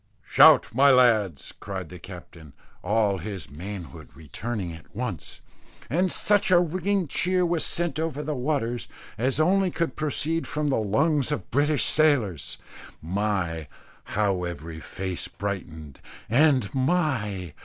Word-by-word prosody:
"Shout, - - +6
my 140 +4 +5
lads," 110 - +3
cried 95 -4 -6
the 90 - -10
captain, 85 -5 -12 0.3
all 100 0 +1
his 95 -5 -7
manhood 85 -1 -8
returning 90 - -5
at 80 +3 -15
once; 105 - -5 0.5
and 180 +4 +2
such 205 +2 +2
a 180 - +6
ringing 185 +2 0
cheer 180 +4 +1
was 170 -2 0
sent 175 -2 -1
over 155 -2 -2
the 150 +1 -2
waters, 125 -3 -2 0.3
as 130 +5 0
only 190 +4 +3
could 170 -1 -2
proceed 155 +2 -1
from 150 0 -1
the 135 - +1
lungs 140 +8 +1
of 150 - -4
Britain's 145 +3 +2
sailors. 125 - +1 0.4
My! 90 -3 -2 0.5
how 100 -4 +1
every 85 -2 -6
face 95 +2 -4
brightened; 80 -8 -6 0.3
and, 130 -3 +3
my! 130 - -1
115 Hz, 135 wpm, -25 LUFS, 90-155 Hz, 0.5 s, Shout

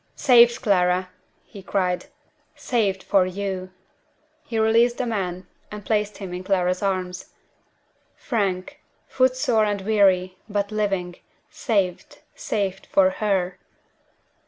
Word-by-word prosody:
"Saved, 240 -2 +5
Clara!" 185 -3 +2 0.3
he 200 - -12
cried. 185 -1 -1 0.5
"Saved 205 -6 -1
for 190 -2 +3
you!" 185 -1 -4 0.7
He 230 - -5
released 230 +2 +3
the 255 - -1
man, 185 -5 -3 0.3
and 210 -2 -8
placed 210 -1 -1
him 190 -3 -7
in 180 +1 -5
Clara's 185 -1 0
arms. 185 -2 -3 0.8
Frank! 195 -7 -3 0.3
foot 255 -1 +2
sore 250 -5 +2
and 205 -1 -2
weary 190 -3 +2
but 205 0 -2
living 195 -4 -2 0.3
saved; 195 -7 -2 0.2
saved 200 - -3
for 190 -1 +3
_her! 190 -3 -1
195 Hz, 115 wpm, -23 LUFS, 185-220 Hz, 0.8 s, Saved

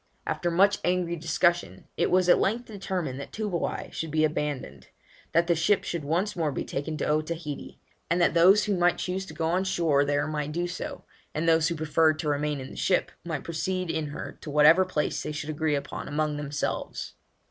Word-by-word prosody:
After 175 - -1
much 195 +4 +4
angry 180 -1 +1
discussion, 170 +2 0
it - - +1
was 185 0 +3
at 175 - +6
length 235 +5 0
determined 190 - -4
that 140 - -8
Toobouai 210 -6 -3
should 165 - -4
be 155 +1 +1
abandoned; 145 - -2 0.4
that 170 +1 +3
the 170 - +3
ship 175 +5 +2
should 170 -3 -3
once 175 +8 0
more 160 -4 0
be - - -3
taken 155 +3 -3
to - - -2
Otaheite; 155 0 -3 0.3
and 170 +2 +2
that 170 - +3
those 185 +5 +6
who 205 -2 0
might 175 0 +3
choose 190 +1 -3
to - - -10
go 165 - -1
on 180 +3 +1
shore 165 -7 +2
there 145 0 +1
might 150 -1 -3
do 175 +2 -1
so, 175 - -6 0.3
and 160 +2 -1
those 165 -1 +4
who 170 - -1
preferred 155 0 +2
to 155 -1 -2
remain 145 0 0
in 130 - -8
the - - -10
ship 185 - +1
might 170 -2 -4
proceed 180 +1 -2
in 160 -2 -2
her 145 - -7
to - - -7
whatever 150 +5 +6
place 155 -5 -1
they - - -4
should 150 0 -4
agree 155 0 0
upon 140 0 -5
among 150 0 -1
themselves. 145 0 -3
160 Hz, 205 wpm, -27 LUFS, 150-180 Hz, 0.4 s, at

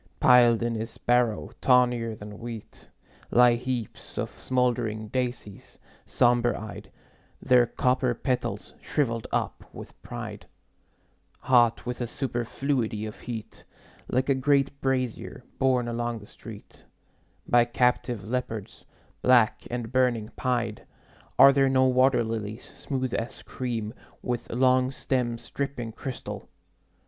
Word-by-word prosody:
Piled 120 -2 +6
in 120 0 0
his 115 0 -5
barrow, 120 -3 +1
tawnier 120 -3 +3
than 105 0 -10
wheat, 115 -2 -9 0.4
Lie 120 0 +6
heaps 120 -2 -5
of - - -3
smoldering 120 -4 -1
daisies, 120 -5 -4 0.3
somber 120 0 +3
eyed, 110 0 -8 0.5
Their 125 -2 +4
copper 125 0 +1
petals 125 +1 -2
shriveled 115 -6 -1
up - - -2
with - - -12
pride, - - -7 0.9
Hot 120 -3 +3
with 125 0 -4
a 120 - -1
superfluity 120 -2 -2
of 110 - -8
heat, 115 -3 -7 0.4
Like 130 +1 0
a 140 - +4
great 140 +1 +1
brazier 130 -3 -2 0.2
borne 130 -2 +2
along 120 0 -2
the 105 - -11
street - - -13 0.6
By 120 -1 +5
captive 120 -2 0
leopards, 115 -2 -4 0.4
black 125 -3 +4
and 120 -1 -4
burning 125 -4 +1
pied. 120 -4 -1 0.5
Are 140 - +9
there 135 -1 +3
no 130 0 +4
water 130 -1 +4
lilies, 110 0 -5
smooth 130 -3 -3
as 115 - -4
cream, 115 -4 -4 0.3
With 120 -2 -3
long 130 +1 +3
stems 120 -3 -2
dripping 135 -5 -3
crystal? 130 +3 -7
120 Hz, 120 wpm, -27 LUFS, 115-130 Hz, 0.9 s, Are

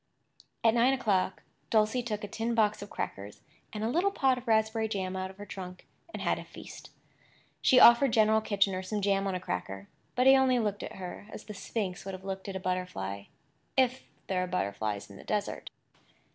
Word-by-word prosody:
At 225 -1 +5
nine 240 +3 +4
o'clock 200 -8 0 0.3
Dulcie 220 +3 +3
took 215 -3 -4
a - - -3
tin 230 +3 -2
box 215 -2 +2
of 205 - -8
crackers 100 +1 -6 0.3
and 210 0 -4
a - - +1
little 345 +11 +2
pot 265 -9 +2
of 245 - -16
raspberry 220 0 +2
jam 190 -3 -3
out 190 0 -3
of 190 - -13
her 205 - -8
trunk, 185 -2 -8 0.3
and - - -5
had - - +1
a - - -7
feast. - - -11 0.7
She 255 - +6
offered 240 +2 +8
General 220 0 +4
Kitchener 195 -3 +1
some 210 +3 -3
jam 195 0 +2
on 190 - -1
a - - -2
cracker; 95 - -5 0.3
but 250 - +2
he 265 0 +9
only 260 -1 +4
looked 210 -3 -1
at - - -6
her 185 +2 -7
as - - -8
the 210 - -8
sphinx 195 -2 -4
would 195 0 -5
have 185 - -12
looked 195 0 -5
at 195 - -5
a - - -2
butterfly—if 180 - -3 0.2
there 185 -1 0
are - - -3
butterflies 105 - -2
in 100 - -12
the - - -12
desert. 210 -1 -3
205 Hz, 200 wpm, -30 LUFS, 185-225 Hz, 0.7 s, he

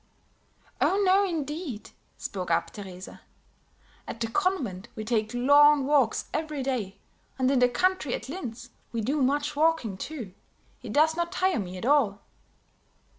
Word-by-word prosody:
"Oh, 390 - +3
no 380 +2 +5
indeed," 305 - -4 0.3
spoke 185 -3 -5
up 165 - +1
Teresa. 190 -2 -10 0.9
"At 230 - -6
the 235 - 0
convent 260 - -1
we 215 - -5
take 220 -1 0
long 285 +3 +5
walks 275 -6 +2
every 305 -3 -2
day; 225 -8 -3 0.4
and 260 0 +2
in 270 - +3
the 250 0 +5
country 335 +1 +1
at - - -7
Linz, 240 -7 -7 0.2
we 230 - -2
do 275 +7 0
much 285 +3 +1
walking, 300 -10 +1
too; 235 -5 -6 0.5
it 240 -4 -7
does 315 +5 +3
not 340 0 -2
tire 375 -4 +1
me 185 -2 -5
at 185 - -6
all." 250 -8 +2
265 Hz, 150 wpm, -27 LUFS, 220-310 Hz, 0.9 s, no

